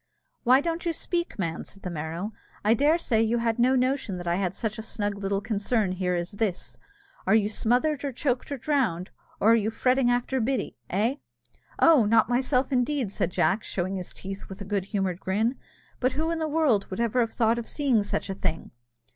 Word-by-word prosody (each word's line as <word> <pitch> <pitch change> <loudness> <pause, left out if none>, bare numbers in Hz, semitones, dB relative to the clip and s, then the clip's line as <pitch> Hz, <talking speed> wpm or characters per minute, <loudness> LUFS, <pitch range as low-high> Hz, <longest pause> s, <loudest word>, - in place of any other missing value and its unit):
"Why 255 +2 +5
don't 335 +1 -2
you 340 -2 0
speak, 345 -2 -2
man?" 165 -4 -2
said 195 - -14
the 180 - -4
Merrow: 165 +6 -4 0.3
"I 215 - +5
dare 290 +7 +3
say 230 -9 +1
you 225 +1 +2
had 230 0 0
no 255 +2 +4
notion 255 -6 0
that 175 - -7
I 170 +1 +1
had 190 -1 -1
such 220 -1 -3
a - - -3
snug 205 -2 -3
little 195 0 -1
concern 210 -1 0
here 180 -1 -1
as 175 0 -3
this? 200 -3 -3 0.5
Are 195 - +5
you 210 -2 +3
smothered, 250 +7 +1
or 280 - -1
choked, 255 +1 -2
or 280 - -2
drowned, 240 - 0 0.3
or 220 - +5
are - - +7
you 220 -1 +1
fretting 255 +2 +2
after 245 +2 0
Biddy, 260 +3 -1
eh?" 225 +9 +1 0.6
"Oh! 310 -9 +6
not 225 +1 +4
myself, 255 +2 +1
indeed," 250 -3 0
said 170 - -1
Jack, 180 +4 +1
showing 185 +1 -2
his 180 - -5
teeth 195 +1 -8
with 190 0 -8
a 200 - -6
good 200 -1 -1
humoured 195 -3 -2
grin; 220 +7 0 0.4
"but 255 0 +1
who 320 +4 -1
in 335 - -1
the 315 - -1
world 295 -10 +2
would 190 - -5
ever 235 +1 +1
have 230 -2 +1
thought 230 0 +2
of 235 - -6
seeing 270 -7 +2
such 205 0 -2
a 195 - -3
thing?" 165 -4 -3
225 Hz, 215 wpm, -26 LUFS, 195-260 Hz, 0.6 s, are